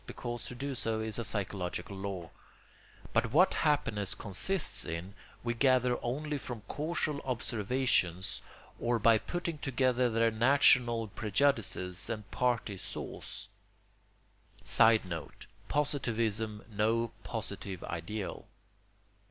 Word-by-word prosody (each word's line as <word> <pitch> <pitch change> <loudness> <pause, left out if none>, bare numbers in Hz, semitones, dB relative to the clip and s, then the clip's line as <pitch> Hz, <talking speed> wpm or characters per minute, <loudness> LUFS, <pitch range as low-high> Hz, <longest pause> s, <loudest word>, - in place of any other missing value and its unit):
because 120 -1 -4
to 125 - -7
do 140 +3 -3
so 115 -3 -1
is 110 +1 -2
a - - -1
psychological 100 -3 -3
law); 95 -3 -4 0.9
but 115 -1 +2
what 175 +8 +5
happiness 105 -10 +1
consists 150 - 0
in 85 +4 -5 0.3
we 120 0 0
gather 125 0 +3
only 145 +4 -2
from 120 -5 -7
casual 150 -1 -1
observations 120 -6 0 0.4
or 120 0 +1
by 115 0 +5
putting 170 0 -3
together 130 -2 +2
their 115 0 +3
national 120 -1 +4
prejudices 105 -5 0
and 105 -3 -5
party 120 -5 0
saws. - - -6 1.2
[Sidenote: 95 -8 +2 0.2
Positivism 115 -7 0
no 115 +2 +1
positive 95 -3 -4
ideal. 95 +5 -5
115 Hz, 105 wpm, -32 LUFS, 105-130 Hz, 1.2 s, what